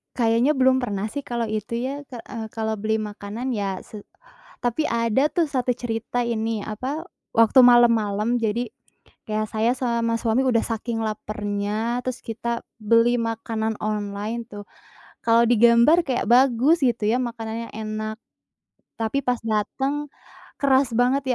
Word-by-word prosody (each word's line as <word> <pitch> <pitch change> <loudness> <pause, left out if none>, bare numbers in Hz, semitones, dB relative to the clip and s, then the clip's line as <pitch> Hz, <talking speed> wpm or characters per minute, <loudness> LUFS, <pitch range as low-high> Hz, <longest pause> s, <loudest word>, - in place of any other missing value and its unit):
Kayaknya 235 +3 +3
belum 260 -2 +3
pernah 205 -2 -2
sih 285 +6 -5
kalau 235 -2 -2
itu 215 0 -4 0.2
ya 285 +2 -5
ka 255 -4 -10
eee, 225 -2 -6
kalau 220 -1 -2
beli 220 +1 -1
makanan 215 +4 -4
ya 195 -3 -2
se 210 -2 -11 0.6
tapi 245 +5 0
ada 235 +2 +2
tuh 340 -3 +1
1 255 -3 0
cerita 240 0 -2
ini, 225 -2 -1
apa 260 +9 -4 0.3
waktu 230 +3 +5
malam-malam 230 -2 +4
jadi 230 +2 -1 0.6
ya 215 0 0
saya 220 +3 +1
sama 235 -2 0
suami 230 +2 +1
udah 235 -3 +3
saking 225 0 -3
laparnya 215 +2 -2
terus 255 0 -4
kita 235 +1 -4 0.2
beli 230 +3 +4
makanan 225 -1 -2
online 210 +2 -3
tuh, 205 0 -9 0.6
kalau 230 0 +5
digambar 235 +8 +5
kayak 255 -5 -1
bagus 260 +5 +4
gitu 235 -3 +1
ya 245 - +2
makanannya 230 -1 -5
enak. 215 0 -4 0.8
Tapi 225 +5 0
pas 250 -1 +1
dateng 270 +7 -1 0.5
keras 270 -2 +3
banget 250 +4 +2
230 Hz, 140 wpm, -23 LUFS, 215-245 Hz, 0.8 s, waktu